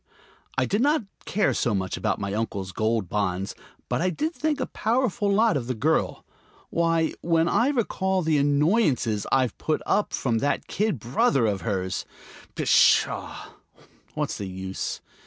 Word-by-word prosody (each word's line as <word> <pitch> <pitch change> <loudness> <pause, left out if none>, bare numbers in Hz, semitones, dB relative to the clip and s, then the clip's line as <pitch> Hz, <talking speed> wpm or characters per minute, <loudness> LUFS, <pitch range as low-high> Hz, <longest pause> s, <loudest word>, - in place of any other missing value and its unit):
I - - +3
did 205 - 0
not 295 0 +3 0.2
care 210 - +1
so 115 -4 0
much 95 -1 -2
about - - -1
my 100 -1 -3
uncle's 100 -3 -3
gold 110 -1 0
bonds, 95 -1 -1 0.3
but - - -1
I 185 - +2
did 310 - -2
think 305 -2 -1
a 260 - 0
powerful 225 -2 0
lot 215 -1 +3
of 125 -4 -2
the 130 - -2
girl. 155 +8 0 0.5
Why, 165 -1 +1
when 165 0 +2
I 235 +8 +3
recall 190 -8 0
the 155 -2 +2
annoyances 145 - +2
I've 130 -4 +2
put 155 - -1
up 210 - +1
with - - -3
from 115 -4 0
that 145 - 0
kid 210 -6 -1
brother 120 +2 +2
of 100 -3 0
hers!... 95 -4 -2 0.5
Pshaw, - - +2 0.7
what's - - -2
the 100 - -4
use? 95 0 -5
145 Hz, 160 wpm, -25 LUFS, -, 0.7 s, I